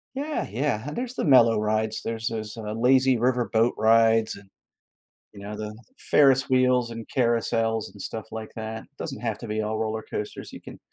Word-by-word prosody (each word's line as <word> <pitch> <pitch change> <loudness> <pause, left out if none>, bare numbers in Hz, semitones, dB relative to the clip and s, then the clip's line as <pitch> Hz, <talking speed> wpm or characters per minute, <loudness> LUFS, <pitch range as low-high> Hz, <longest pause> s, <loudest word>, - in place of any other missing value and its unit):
Yeah, 295 +3 -2
yeah. 125 +2 -1
There's 245 +8 -4
the - - -3
mellow 115 -6 +6
rides, 110 +1 -1
there's 115 0 -3
those, 110 -1 -4
uh, 105 -1 -5
lazy 130 +2 +4
river 120 0 +1
boat 115 +2 +3
rides 115 0 +4
and, 100 -1 -15 0.8
you - - -12
know, 105 +1 -6
the 105 0 -6 0.2
Ferris 135 -2 +3
wheels 125 -2 +3
and 115 -1 -7
carousels 115 -3 0
and 100 - -16
stuff 110 +3 -5
like 110 -1 -6
that, 110 0 -5 0.2
doesn't 135 -5 -5
have 115 -3 -2
to 120 - -7
be 110 0 -1
all 110 +1 -2
roller 110 0 -2
coasters, 105 - -6
you - - -9
can - - -11
115 Hz, 185 wpm, -25 LUFS, 110-125 Hz, 0.8 s, mellow